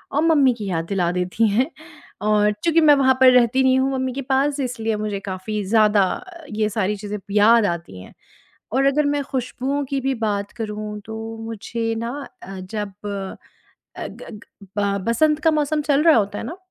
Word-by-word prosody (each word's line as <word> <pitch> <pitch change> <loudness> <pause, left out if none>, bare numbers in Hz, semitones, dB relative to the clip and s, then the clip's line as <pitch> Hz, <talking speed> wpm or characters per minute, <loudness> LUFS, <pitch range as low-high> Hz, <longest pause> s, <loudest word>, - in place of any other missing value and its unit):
और 295 - +3
मम्मी 285 -6 +4
की 215 -3 -6
याद 165 -2 -1
दिला 180 -3 +1
देती 180 +5 +1
हैं। 245 +8 +1 0.5
और 210 0 +3
चूँकि 330 -1 +4
मैं 300 -1 +7
वहाँ 265 -1 +4
पर 255 -1 +8
रहती 250 +1 +4
नहीं 260 0 +4
हूँ, 265 +1 +1
मम्मी 260 -1 -2
के 275 - -4
पास, 275 +2 0
इसलिए 235 -3 -2
अब 210 - -3
मुझे 210 -2 -2
काफ़ी 195 +2 -4
ज़्यादा 210 -1 +4 0.5
ये 215 0 0
सारी 210 -1 -1
चीज़ें 210 +1 -5
याद 215 +2 +5
आती 170 - -4
हैं। - - -14 0.6
और 270 +3 +2
अगर 285 +2 +3
मैं 285 0 0
खुशबूओं 265 +2 -2
की 275 +1 -2
भी 265 +1 0
बात 205 -1 -2
करूँ, 210 -1 -4
तो 220 +2 -7
मुझे 225 +1 -3
ना 230 +1 -3 0.3
अ, 195 0 -8
जब 200 +1 -5
अ, 195 -2 -9
ग - - -11
ग 210 - -10 0.4
ब 200 -1 +1
बसंत 300 +6 +2
का 320 - +4
मौसम 300 0 0
चल 285 0 +2
रहा 325 -2 +6
होता 205 -2 0
है - - -5
ना, 330 +10 -6
225 Hz, 195 wpm, -21 LUFS, 205-270 Hz, 0.6 s, पर